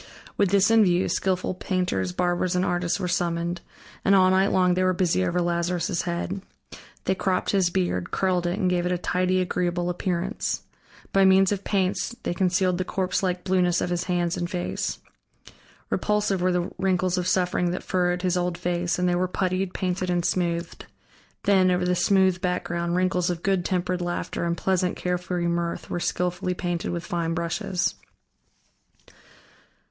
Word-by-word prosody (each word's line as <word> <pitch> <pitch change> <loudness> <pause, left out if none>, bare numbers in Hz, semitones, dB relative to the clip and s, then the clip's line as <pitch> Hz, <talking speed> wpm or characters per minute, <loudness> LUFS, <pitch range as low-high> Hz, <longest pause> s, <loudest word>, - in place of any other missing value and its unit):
With 200 - +2
this 200 +2 +4
in 225 -1 +6
view, 180 -1 +2
skillful 185 -1 0
painters, 180 - -1
barbers, 175 - 0
and 180 +1 +2
artists 175 +1 0
were 185 - -2
summoned, 170 0 -1 0.4
and 200 - +4
all 185 -1 +5
night 190 +1 +4
long 180 -1 +3
they 185 - 0
were 185 0 +3
busy 175 - +1
over 175 - 0
Lazarus' 175 +1 0
head. 180 +2 -3 0.6
They 190 - +2
cropped 190 0 0
his 190 -3 +3
beard, 175 - -1
curled 180 -2 0
it, 175 +3 -1
and 195 -4 +1
gave 180 -1 +1
it - - -1
a 180 - +1
tidy, 185 +1 +1
agreeable 175 -1 -1
appearance. 180 +3 -2 0.5
By 195 - +5
means 190 0 +5
of 200 -1 -2
paints 195 +3 0
they - - -1
concealed 180 0 +1
the - - +1
corpse 185 0 -1
like 180 -2 -1
blueness 180 -2 +2
of 180 - -2
his 175 +1 -1
hands 175 -2 0
and 175 - -2
face. 180 -1 -3 0.9
Repulsive 210 -3 +1
were 185 +1 +2
the 180 0 -1
wrinkles 185 -1 +1
of 180 - -2
suffering 180 -1 +1
that 180 - -3
furrowed 180 0 0
his 180 -1 +1
old 175 -1 -1
face, 175 0 -1
and 180 0 +1
they 175 - +2
were 180 +1 +1
puttied, 185 0 -1
painted, 185 0 -2
and 175 -1 0
smoothed; 170 -2 -2 0.6
then, 190 -2 +4
over 180 0 +1
the 180 - +2
smooth 190 0 +3
background, 175 -2 -1
wrinkles 180 -1 +1
of 175 -1 -3
good 195 -2 +1
tempered 180 0 -1
laughter 175 0 -3
and 170 0 -1
pleasant, 185 -1 0
carefree 180 -1 -2
mirth 170 0 -2
were 175 - -1
skillfully 180 +1 -1
painted 175 -2 -2
with 170 -1 -4
fine 165 -1 -2
brushes. 175 +2 -1
180 Hz, 175 wpm, -25 LUFS, 175-185 Hz, 0.9 s, in